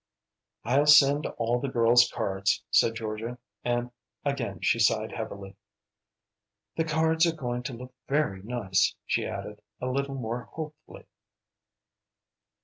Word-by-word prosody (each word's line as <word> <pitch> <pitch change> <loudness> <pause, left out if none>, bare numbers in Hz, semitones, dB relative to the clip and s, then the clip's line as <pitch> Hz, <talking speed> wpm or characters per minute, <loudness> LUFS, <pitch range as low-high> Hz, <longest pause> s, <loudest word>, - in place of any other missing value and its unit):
"I'll 140 +5 +2
send 145 0 +6
all 115 +1 0
the 135 - -3
girls 120 0 +4
cards," 95 +1 -1
said 115 - +4
Georgia, 115 +2 -5 0.3
and 120 0 -1 0.3
again - - -2
she - - +2
sighed - - +2
heavily. 100 -1 -7 1.2
"The 160 - 0
cards 160 +1 +2
are 165 - -1
going 125 -5 -3
to 125 +1 -5
look 125 +2 -9 0.2
very 135 -10 0
nice," 100 -4 0
she - - 0
added, - - -7 0.2
a - - -4
little 135 +2 -2
more 120 -1 -4
hopefully. 155 -1 -9
125 Hz, 130 wpm, -27 LUFS, 115-145 Hz, 1.2 s, send